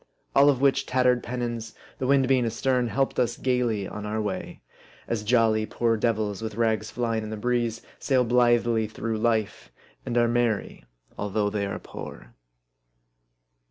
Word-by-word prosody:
All 140 +1 +7
of 135 -3 +2
which 140 0 +2
tattered 125 -1 +2
pennons, 120 -2 -4 0.2
the 130 - -1
wind 135 -1 +4
being 130 -1 +3
astern, 125 +2 0
helped 135 +3 0
us 120 -1 +1
gayly 120 -6 0
on 105 - -7
our 105 +1 -2
way; 105 -3 -4 0.5
as 115 -2 -1
jolly 110 -1 +2
poor 115 -1 +1
devils, 110 -2 -1
with 110 -2 -5
rags 110 -1 0
flying 115 -2 -1
in 110 - -6
the 110 - -5
breeze, 120 0 -1 0.2
sail 130 -3 +2
blithely 120 -2 +3
through 110 +1 -4
life; 110 - -1 0.3
and 120 - -2
are 120 0 +4
merry 115 - -1 0.3
although 105 0 -1
they 100 -1 -1
are 100 - -4
poor - - -10
115 Hz, 160 wpm, -26 LUFS, 110-125 Hz, 0.5 s, All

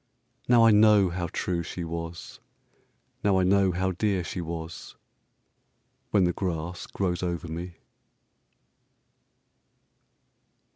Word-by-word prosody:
Now 120 -2 +6
I 115 - +7
know 105 -3 +5
how 85 0 -3
true 90 0 -2
she 85 +1 -6
was; 85 +1 -6 0.8
Now 100 -2 +3
I 95 - +3
know 95 0 +3
how 95 +2 -1
dear 95 0 0
she 90 - -5
was"—When 85 +4 -7
the 90 0 +2
grass 85 -1 -4
grows 90 -3 -2
over 85 -1 -3
me! 85 +2 -6
90 Hz, 105 wpm, -27 LUFS, 85-95 Hz, 0.8 s, I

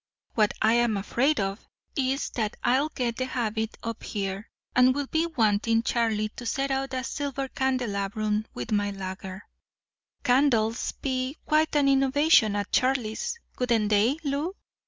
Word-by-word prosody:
What 215 -2 +2
I'm 230 0 +3
afraid 250 +9 +1
of 195 +1 -3 0.3
is 270 0 0
that 215 -3 -2
I'll 265 +5 +2
get 240 -5 -2
the 255 - -1
habit 220 -3 -2
up 230 -1 -4
here, 195 0 -4 0.3
and 255 +1 +5
will 285 0 -1
be 320 +4 0
wanting 225 -5 +2
Charlie 225 -3 0
to 245 - -7
set 275 +3 -1
out 270 0 -1
a 255 - -2
silver 275 0 -3
candelabrum 215 -5 -1
with 125 - -5
my 205 -1 +1
lager. 190 0 -6 0.8
Candles'd 245 -3 +2
be 260 +1 -1
quite 310 0 +2
an 285 -1 +4
innovation 270 -4 +4
at 205 0 -2
Charlie's, 255 - 0 0.2
wouldn't 235 -4 +2
they, 215 +7 +3
Lou?" 295 +6 -2
240 Hz, 145 wpm, -27 LUFS, 215-270 Hz, 0.8 s, and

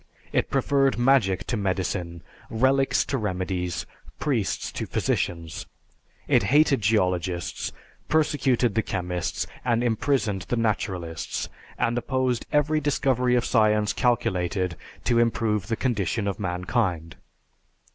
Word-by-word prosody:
It - - +1
preferred 135 -2 +2
magic 120 -7 +3
to 120 - -2
medicine, 95 -4 -2 0.3
relics 135 +4 +2
to 135 - -1
remedies, 90 -4 -2 0.3
priests 125 -10 -1
to - - -4
physicians. 85 -2 -2 0.6
It - - +4
hated 140 +4 +4
geologists, 90 -4 0 0.4
persecuted 140 -7 +2
the 110 - +2
chemists, 90 -4 -2 0.2
and 120 -1 +1
imprisoned 110 -4 0
the 120 - 0
naturalists, 95 -7 -2 0.3
and 115 - +1
opposed 130 -1 -1
every 150 +1 +2
discovery 130 -4 +1
of 120 - +1
science 105 -2 +3
calculated 95 -7 0 0.3
to 120 -1 +2
improve 110 -4 +1
the 115 - 0
condition 110 -4 -1
of 100 - -2
mankind. 90 -2 -1
110 Hz, 115 wpm, -25 LUFS, 95-125 Hz, 0.6 s, It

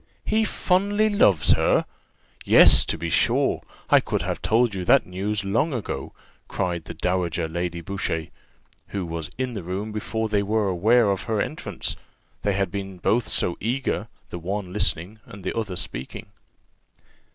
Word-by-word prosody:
"He 220 +1 +2
fondly 205 +3 +1
loves 105 - +4
her! - - +3 0.6
Yes, - - +8
to - - -1
be 85 -1 -4
sure, - - +2 0.3
I - - +8
could - - -2
have - - -3
told 115 0 +2
you 95 -2 -3
that - - +5
news 100 +3 -3
long 115 +11 +1
ago," 115 - -4 0.4
cried 85 -3 -2
the - - -7
dowager 90 -2 -1
Lady 85 +1 -3
Boucher, 80 -3 -3 0.6
who 100 -3 -4
was 80 -2 -5
in 130 -1 -2
the 105 - -4
room 95 +5 -4
before 110 +1 -2
they 105 -2 +1
were 105 +1 0
aware 105 +4 +3
of 95 -1 -3
her 110 -2 -1
entrance; 155 - -3 0.5
they 100 - 0
had 95 -2 -1
both 95 -2 -6
been 120 - +3
so 85 - +1
eager, 130 +5 -2 0.2
the 85 - -5
one 95 +1 -4
listening, 105 0 -1
and 100 -1 -11
the 95 - -3
other 110 -5 -3
speaking. 65 - -6
100 Hz, 165 wpm, -24 LUFS, 90-110 Hz, 0.6 s, Yes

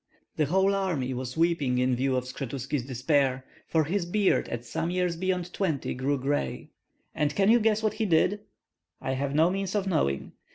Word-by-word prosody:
The 155 - +2
whole 190 +6 +2
army 170 -10 -1
was 125 +1 -5
weeping 165 -7 +2
in 125 0 +2
view 130 +1 0
of 125 - 0
Skshetuski's 135 +2 -4
despair; 130 0 +1 0.2
for 160 -1 +2
his 175 +3 -1
beard 200 +2 +2
at 120 0 -5
some 165 - -2
years 180 -1 0
beyond 180 0 -2
twenty 160 -9 -1
grew 135 +3 0
gray, 135 - -2 0.4
and 150 -1 0
can 200 +2 +4
you 240 - +6
guess 220 0 +2
what 215 - +1
he 220 - -1
did?" 180 +4 +3 0.6
"I 130 - -3
have 140 +1 -2
no 160 +3 +4
means 195 +1 -2
of 200 -2 +1
knowing." 150 - 0
155 Hz, 190 wpm, -27 LUFS, 130-190 Hz, 0.6 s, you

